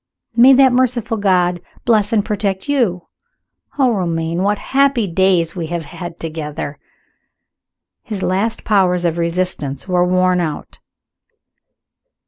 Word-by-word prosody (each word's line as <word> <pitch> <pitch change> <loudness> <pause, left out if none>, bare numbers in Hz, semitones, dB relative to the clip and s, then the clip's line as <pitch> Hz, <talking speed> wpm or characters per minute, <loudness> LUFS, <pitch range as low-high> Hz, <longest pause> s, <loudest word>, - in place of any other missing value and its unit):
May 250 +3 +7
that 265 -1 +5
merciful 240 -3 0
God 180 -3 +1 0.2
bless 215 -4 +2
and 215 -2 +1
protect 200 -1 -2
you! 220 -12 0 0.7
Oh, 260 -3 +3
Romayne, 170 -3 -2
what 205 +2 +1
happy 275 -3 +1
days 180 -2 +1
we 170 -3 -4
have 170 -1 -4
had 175 +3 -8
together!" 150 -3 -6 1.2
His 205 -4 -6
last 200 +5 -1
powers 180 -4 +2
of 170 0 0
resistance 170 -4 -2
were 180 -1 +2
worn 185 0 +2
out. 155 -3 -5
185 Hz, 120 wpm, -17 LUFS, 170-220 Hz, 1.2 s, May